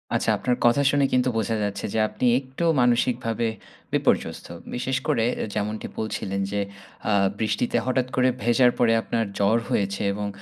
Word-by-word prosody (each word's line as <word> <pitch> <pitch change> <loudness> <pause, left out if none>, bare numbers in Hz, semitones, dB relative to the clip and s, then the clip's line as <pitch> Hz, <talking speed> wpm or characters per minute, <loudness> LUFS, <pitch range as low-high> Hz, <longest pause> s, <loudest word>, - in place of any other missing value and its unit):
আচ্ছা। - - 0
আপনার 125 - 0
কথা 120 +4 +4
শুনে 145 -1 +3
কিন্তু 125 0 +3
বোঝা 110 +1 0
যাচ্ছে 100 -1 -3
যে 110 - +1
আপনি - - -3
একটু 130 +4 -7 0.2
মানসিকভাবে 120 -1 +1 0.5
বিপর্যস্ত। - - 0 0.3
বিশেষ 130 +1 -1
করে 115 - +2 0.2
এ - - -1
যেমনটি 105 +1 -2
বলছিলেন, 100 -3 -3
যে 100 - 0 0.5
আ - - +3 0.3
বৃষ্টিতে 110 +2 0
হঠাৎ 130 0 +1
করে 130 0 +4
ভেজার 120 +1 +4
পরে 115 -2 +4
আপনার 115 0 -1
জ্বর 100 +3 +3
হয়েছে। 100 0 0
এবং 105 0 -3
115 Hz, 160 wpm, -24 LUFS, 105-125 Hz, 0.5 s, কথা